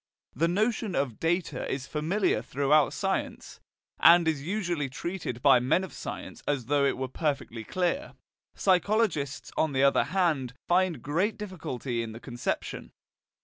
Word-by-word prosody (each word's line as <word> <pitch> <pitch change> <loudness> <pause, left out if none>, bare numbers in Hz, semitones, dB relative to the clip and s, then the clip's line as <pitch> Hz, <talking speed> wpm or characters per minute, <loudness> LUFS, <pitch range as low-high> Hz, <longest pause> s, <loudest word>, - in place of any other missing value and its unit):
The 165 +7 +2
notion 215 +2 0
of 130 -6 -1
"data" 165 -4 -1
is 135 0 -3
familiar 155 - 0
throughout 140 +4 +2
science, - - -3 0.4
and 170 0 +7
is 155 -4 0
usually 175 -4 -2
treated 140 -3 -5
by 135 -3 +7
men 130 +9 +2
of 190 - -7
science - - -7
as 140 -5 0
though 140 +2 +2
it 140 - +1
were 130 0 -2
perfectly 130 -5 -3
clear. 185 - -2 0.4
Psychologists, 185 - +1
on 155 -3 +1
the 135 0 +2
other 140 - +4
hand, 155 -10 0
find 180 -2 +2
great 175 +9 0
difficulty 135 - -4
in 115 -1 -5
the 115 - -9
conception. 120 -1 -4
150 Hz, 145 wpm, -28 LUFS, 135-185 Hz, 0.4 s, and